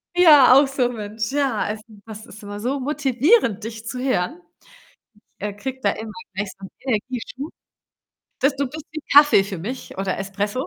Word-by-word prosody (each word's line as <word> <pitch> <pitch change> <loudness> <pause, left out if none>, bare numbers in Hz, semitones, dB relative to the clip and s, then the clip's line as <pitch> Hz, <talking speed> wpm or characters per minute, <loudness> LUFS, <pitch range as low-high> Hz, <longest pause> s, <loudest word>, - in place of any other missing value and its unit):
Ja, 295 -8 +8
auch 275 +1 +6
so, 260 -3 0
Mensch. 215 0 -4
Ja, 275 -6 0
also, 210 +1 -4 0.2
das 220 0 -9
ist 215 0 -13
immer 205 0 -7
so 260 +6 -2
motivierend, 270 - +2
dich 220 0 -7
zu 250 - -4
hören. 255 - -1 1.0
Äh, 205 0 -4
kriege 260 +5 -6
da 200 - +3
immer 220 0 -7 0.2
gleich 200 +1 -3
so 195 - -8
'n - - -11
Energieschub. 255 +4 -4 0.9
Das 275 +1 +3
du 280 +1 -1
bist 305 +4 -8
wie 310 0 -6
Kaffee 290 -7 +7
für 195 0 -6
mich 230 +10 -7
oder 195 -1 -2
Espresso. 205 - -3
245 Hz, 175 wpm, -22 LUFS, 205-275 Hz, 1.0 s, Ja